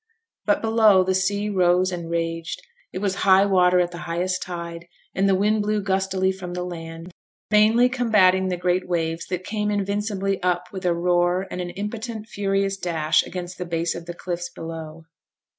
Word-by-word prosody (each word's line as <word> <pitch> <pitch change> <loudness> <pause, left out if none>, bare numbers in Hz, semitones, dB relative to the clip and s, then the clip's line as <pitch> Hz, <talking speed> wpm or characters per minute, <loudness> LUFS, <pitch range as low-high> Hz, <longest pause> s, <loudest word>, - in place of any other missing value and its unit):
But, 205 - +2
below, 220 -4 +5
the 190 +1 0
sea 200 +2 0
rose 185 -2 +2
and 170 -2 -5
raged; 165 -1 -2 0.3
it - - -6
was 195 0 0
high 195 0 +6
water 180 -2 +4
at 175 -1 +1
the 170 - -8
highest 180 +2 -1
tide, 170 -1 -6 0.3
and 195 +1 +2
the 195 - +4
wind 210 +3 +2
blew 210 +1 0
gustily 190 -1 0
from 180 -2 -7
the 180 - -3
land, 165 0 -7 0.4
vainly 220 +3 +5
combating 210 -7 +3
the 180 -1 -1
great 180 +1 0
waves 165 -1 -2
that 180 0 -3
came 210 -1 -2
invincibly 200 -1 -1
up 180 0 0
with 190 -2 -4
a 170 - +2
roar 175 +1 +1
and 180 - -3
an 175 - -4
impotent 215 +3 -5
furious 195 -2 0
dash 160 -4 +1
against 180 0 -7
the - - -2
base 170 0 -1
of 170 0 -8
the 175 - -6
cliffs 175 0 -4
below. 165 -1 -8
185 Hz, 180 wpm, -23 LUFS, 175-200 Hz, 0.4 s, high